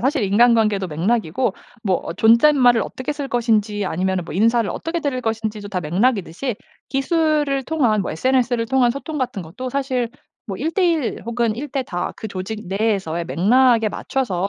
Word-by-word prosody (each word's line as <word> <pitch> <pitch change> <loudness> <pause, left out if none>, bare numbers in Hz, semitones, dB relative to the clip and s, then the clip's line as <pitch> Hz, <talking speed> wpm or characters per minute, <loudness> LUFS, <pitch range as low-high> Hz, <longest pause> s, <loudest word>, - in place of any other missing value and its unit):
사실 270 0 +1
인간관계도 215 -2 +3
맥락이고 195 +5 0 0.3
뭐 190 -2 +2
어 - - -4
존댓말을 240 - +5
어떻게 260 +3 -4
쓸 285 -1 -5
것인지 215 -4 +1
아니면은 185 0 -1
뭐 165 - -8
인사를 230 +1 +2
어떻게 335 +1 -3
드릴 275 -4 -2
것인지도 220 -2 -3
다 185 -2 -2
맥락이듯이 200 - 0 0.3
기술을 295 -1 +1
통한 245 -10 +1
뭐 - - -4
SNS를 245 +4 +1
통한 250 0 +3
소통 290 +4 -5
같은 250 -7 -2
것도 230 +11 -7
사실 260 -3 -1 0.4
뭐 195 -3 -4
1 320 - -2
대1 335 - 0
혹은 235 -1 0
1 285 +6 -5
대다 250 -11 -3
그 - - -6
조직 210 +3 -6
내에서의 190 -4 -1
맥락에 230 +5 +3
맞춰서 200 -5 -2
230 Hz, 355 characters per minute, -21 LUFS, 200-265 Hz, 0.4 s, 존댓말을